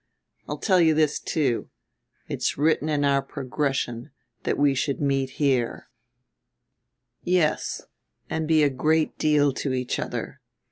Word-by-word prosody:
I'll - - -3
tell 185 -4 +3
you 160 -2 +4
this 155 -1 +2
too: 135 -7 -1 0.6
It's - - -2
written 155 +1 +2
in 145 -2 +1
our 140 -1 +3
progression 135 -3 -3 0.4
that - - 0
we 145 -1 +3
should 135 +1 -1
meet 135 -2 0
here, 130 -5 0 1.3
yes, 175 -4 0 0.4
and 160 -1 -2
be 155 -1 +4
a 145 - +3
great 155 +4 +1
deal 145 -2 +3
to 135 0 -2
each 125 -1 -2
other. - - -5
145 Hz, 135 wpm, -25 LUFS, 135-155 Hz, 1.3 s, you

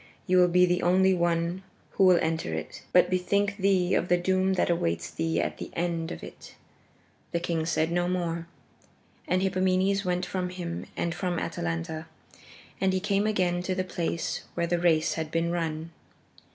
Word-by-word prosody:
You 185 0 +3
will 180 - +6
be 180 +1 +5
the 180 0 +1
only 190 +2 +4
one 170 +1 0 0.3
who - - +2
will 180 -1 +7
enter 160 - -1
it. 80 - -6
But 180 0 +5
bethink 200 +3 +1
thee 190 -2 +2
of - - +1
the 180 - +4
doom 185 +1 +1
that 180 - +1
awaits 85 - -1
thee 165 0 -1
at - - -2
the - - -6
end 170 -1 -1
of - - -7
it." - - -11 0.8
The 170 - +1
king 165 -2 -2
said 160 0 +1
no 175 0 +1
more, 170 -2 -2 0.8
and 185 +1 +1
Hippomenes 190 +1 +1
went 180 -1 -1
from 180 0 -3
him 175 -2 -5
and 170 - -1
from 180 -1 -2
Atalanta, 85 - -3 0.7
and 190 -1 +2
he 190 - +1
came 200 +1 +1
again 180 -4 +1
to 185 +1 -2
the 185 - 0
place 170 -2 -3
where 170 - 0
the 175 +1 0
race 160 -2 +3
had 160 -1 -3
been 165 +1 0
run. 165 -1 -3
175 Hz, 180 wpm, -27 LUFS, 165-185 Hz, 0.8 s, will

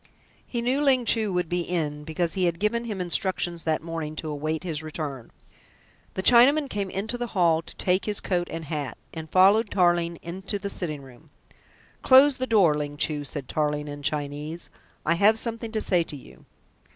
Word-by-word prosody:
He 235 -2 -3
knew 260 +4 +1
Ling 260 -4 +3
Chu 220 -3 +2
would 180 -1 -1
be 175 +2 -1
in, 155 -4 -2
because 165 +2 -2
he 185 -1 +1
had 170 -1 0
given 235 +3 0
him 210 -4 -4
instructions 175 -1 0
that 155 -1 0
morning 165 -2 -5
to 155 0 -5
await 155 +3 -3
his 160 -4 -3
return. 150 -5 -6 0.8
The 190 - -2
Chinaman 265 +6 +6
came 200 -1 -2
into 215 +6 -3
the 240 - -2
hall 165 -2 +4
to - - -12
take 185 +1 0
his 210 -1 -2
coat 175 -2 -1
and 165 -1 -6
hat, 150 -2 -4 0.2
and 160 -1 -7
followed 200 +5 +5
Tarling 175 -2 +2
into 190 +4 -4
the 200 0 -5
sitting 155 -7 -4
room. 135 +4 -16 0.7
"Close 265 +1 +6
the 255 - -2
door, 200 -9 +4
Ling 145 -1 -4
Chu," 150 -1 +1
said 140 -2 -6
Tarling 150 -1 -1
in 145 0 -7
Chinese. 150 +3 -3 0.3
"I 165 - +3
have 205 +6 +4
something 230 0 -4
to 220 - -1
say 180 -4 +2
to 165 - -6
you." 65 - -16
175 Hz, 190 wpm, -25 LUFS, 155-210 Hz, 0.8 s, Chinaman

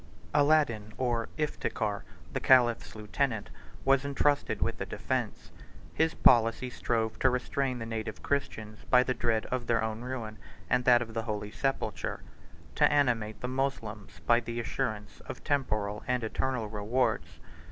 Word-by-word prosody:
Aladin, 145 -8 +3
or 120 -3 0
Iftikhar, 110 -8 -2 0.3
the - - 0
caliph's 120 -4 +4
lieutenant, 110 +1 -2 0.3
was 135 0 +4
intrusted 140 +1 +1
with - - -1
the - - -2
defence: - - -3 0.4
his 160 0 +1
policy 115 +1 +4
strove 115 -2 -1
to 130 - +4
restrain 130 +1 -1
the 115 - -5
native 110 -2 -5
Christians 110 -7 -2
by 125 0 +6
the 130 - 0
dread 115 -3 0
of 125 -1 -2
their 115 -1 +2
own 110 0 -3
ruin 120 -4 -5 0.3
and 125 0 +2
that 120 -1 +6
of 115 -1 -11
the 115 - -1
holy 105 -2 -4
sepulchre; 130 -7 -2 0.5
to - - +4
animate 115 -7 +1
the 125 - -2
Moslems 125 -6 -3
by 120 0 +5
the 115 0 -5
assurance 110 -2 -3
of - - -7
temporal 105 -7 -1
and 125 -1 0
eternal 125 +1 -1
rewards. 110 +3 -1
120 Hz, 150 wpm, -30 LUFS, 110-130 Hz, 0.5 s, by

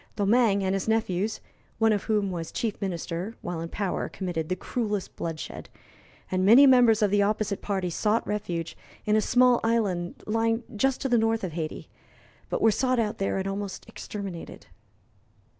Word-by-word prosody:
Domingue 205 -1 +3
and 190 0 0
his 195 +1 -2
nephews, 220 -2 0 0.4
one 225 0 +4
of 205 - -2
whom 210 -3 +1
was 165 -2 -5
Chief 220 -3 -3
Minister, 180 +2 -3
while 175 -2 -4
in 165 - -5
power 195 -1 -2
committed 175 -4 -4
the 185 - 0
cruellest 210 0 -3
bloodshed, 165 -2 -6 0.6
and 185 0 +1
many 235 +8 +8
members 240 -5 +5
of 205 - +2
the 205 0 +3
opposite 205 0 0
party 190 -3 -2
sought 215 +6 +1
refuge 175 -6 -3 0.3
in 210 - +2
a 215 - +4
small 250 +2 +4
island 200 -7 0
lying 225 +2 0
just 265 +5 +1
to - - 0
the 240 -2 +3
north 225 0 +1
of 185 - -2
Hayti, 155 -1 -5 0.6
but - - -1
were 225 - +6
sought 255 +3 +1
out 220 -2 -1
there 195 - 0
and 190 0 -2
almost 195 0 -5
exterminated. 195 -5 -7
205 Hz, 175 wpm, -27 LUFS, 185-225 Hz, 0.6 s, many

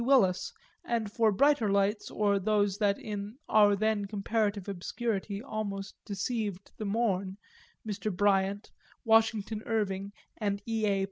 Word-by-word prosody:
Willis 235 -9 +3 0.3
and, 225 -3 -1
for 225 -1 +3
brighter 275 +1 +3
lights 200 +2 +1
or 205 -1 +1
those 205 -1 +1
that 200 -2 +2
in 210 +1 -6
our 205 -1 +5
then 215 0 +1
comparative 205 0 -1
obscurity 200 +1 -3
almost 200 -5 -4
deceived 205 -1 -3
the 215 - -4
morn, 200 -3 0 0.5
Mr. 215 0 -2
Bryant, 200 +1 +1 0.3
Washington 220 -1 +3
Irving 200 -3 -1 0.3
and 200 -2 -1
E. 225 -2 0
A. 200 -1 +2
205 Hz, 130 wpm, -30 LUFS, 200-220 Hz, 0.5 s, our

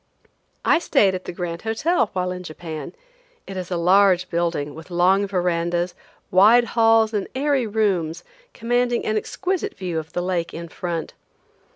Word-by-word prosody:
I 325 - +4
stayed 210 - +3
at 185 0 -5
the - - -4
Grand 170 -1 -5
Hotel 225 - +1
while 180 -1 -1
in 180 0 -5
Japan. 160 - -7 0.5
It 195 - -8
is 185 -2 -5
a 180 - -1
large 180 +1 +4
building, 170 -4 -1
with 160 +3 -11
long 185 +3 +3
verandas, 175 -1 -1 0.4
wide 215 +6 +6
halls 225 -1 +4
and 205 -2 -1
airy 275 -3 +1
rooms, 185 -6 0 0.3
commanding 245 +1 0
an 215 - 0
exquisite 380 - -2
view 175 -4 -3
of 155 0 -10
the 175 - -1
lake 180 -2 -2
in 170 0 -7
front. 170 -2 -4
185 Hz, 160 wpm, -22 LUFS, 175-220 Hz, 0.5 s, wide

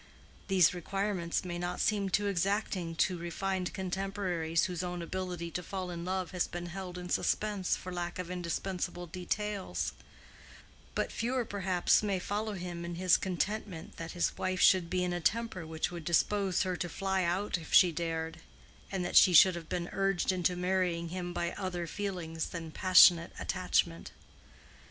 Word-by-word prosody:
These 185 -4 +5
requirements 185 -1 -2
may 175 -1 -4
not 175 0 -3
seem 200 -2 +1
too 205 +2 +1
exacting 195 -2 -1
to 180 +1 +1
refined 180 +2 -2
contemporaries 185 -3 -1
whose 180 -2 -2
own 180 -1 -4
ability 180 -1 -4
to 180 - -3
fall 185 +1 -5
in 170 -1 -5
love 185 -1 -2
has 180 -2 0
been 175 0 -6
held 180 0 -6
in 180 0 -6
suspense 205 +1 0
for 185 - -7
lack 175 0 -3
of 180 -1 -5
indispensable 180 0 -3
details; 190 +3 -3 1.0
but - - -1
fewer 245 +1 -1
perhaps 190 -4 +2
may 200 -3 0
follow 210 +3 -2
him 175 -2 -5
in 170 0 -5
his 180 0 +4
contentment 190 -1 -3
that 165 -1 -6
his 175 - 0
wife 185 0 -1
should 180 -2 +5
be 180 0 0
in 180 -1 -1
a 175 - -2
temper 205 -3 -1
which 160 +2 -2
would 170 -2 -6
dispose 190 +3 +2
her 185 -1 -1
to 175 - -3
fly 190 +1 -1
out 180 +2 0
if 160 - -11
she 180 - +7
dared, 165 0 -3 0.5
and 190 -2 -2
that - - -3
she 185 - +8
should 185 +3 +8
have 170 -2 -7
been 175 -1 -2
urged 195 -2 +1
into 180 -1 +1
marrying 180 -2 0
him 175 0 -4
by 170 0 -2
other 180 -3 -3
feelings 175 -4 -3
than 165 -2 -6
passionate 175 -1 +6
attachment. 85 0 0
180 Hz, 170 wpm, -31 LUFS, 170-190 Hz, 1.0 s, she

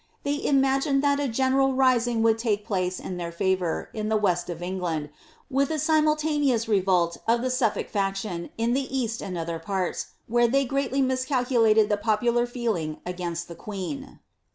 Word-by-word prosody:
They 285 +1 -1
imagined 275 0 +2
that 285 0 +3
a 285 - 0
general 265 +2 +2
rising 245 -3 +2
would 225 0 +3
take 210 -3 -1
place 185 -2 -1
in 180 - -6
their 170 -1 -4
£ivour, 180 -1 -1
in 215 -1 -3
the 220 - +3
west 180 -4 0
of 175 0 -5
England, 175 -5 -3 0.4
with 275 +1 +1
a 315 - -1
simultaneous 305 -5 +2
revolt 185 -5 +2
of 235 +1 +2
the 255 - 0
Suffolk 225 -5 -1
Action 195 -3 -2
in 230 +1 +1
the 270 0 -1
east 230 -2 -2
and 185 -3 -5
other 165 0 -3
parts, 185 +2 -2 0.2
where 240 +1 +3
they 275 +3 +2
greatly 275 0 0
miscalculated 250 -4 +2
the 210 - +1
popular 235 +3 +1
feeling 220 -11 -2
against 175 -1 -4
the 170 - -8
queen.' 210 - -6
225 Hz, 170 wpm, -26 LUFS, 185-265 Hz, 0.4 s, that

